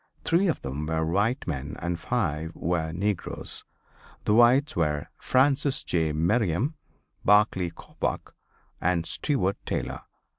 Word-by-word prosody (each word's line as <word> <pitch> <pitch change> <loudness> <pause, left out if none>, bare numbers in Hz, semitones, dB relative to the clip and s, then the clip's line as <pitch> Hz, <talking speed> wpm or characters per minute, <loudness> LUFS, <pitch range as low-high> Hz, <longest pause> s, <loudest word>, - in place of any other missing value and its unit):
Three 180 +4 +3
of 165 - 0
them 70 +3 -4
were 80 0 0
white 100 +10 +1
men 75 -2 -4
and 85 -1 -3
five 80 +1 -1
were 80 -1 -1
negroes. 95 +3 -3 0.6
The 105 - +3
whites 120 +5 +5
were 75 -3 0
Francis 135 +1 +2
J. 80 -3 0
Merriam, 95 - +1 0.5
Barclay 100 -3 +4
Coppoc 85 - -4 0.5
and 85 -1 +1
Steward 100 - 0
Taylor. 65 +1 -3
90 Hz, 120 wpm, -27 LUFS, 80-120 Hz, 0.6 s, whites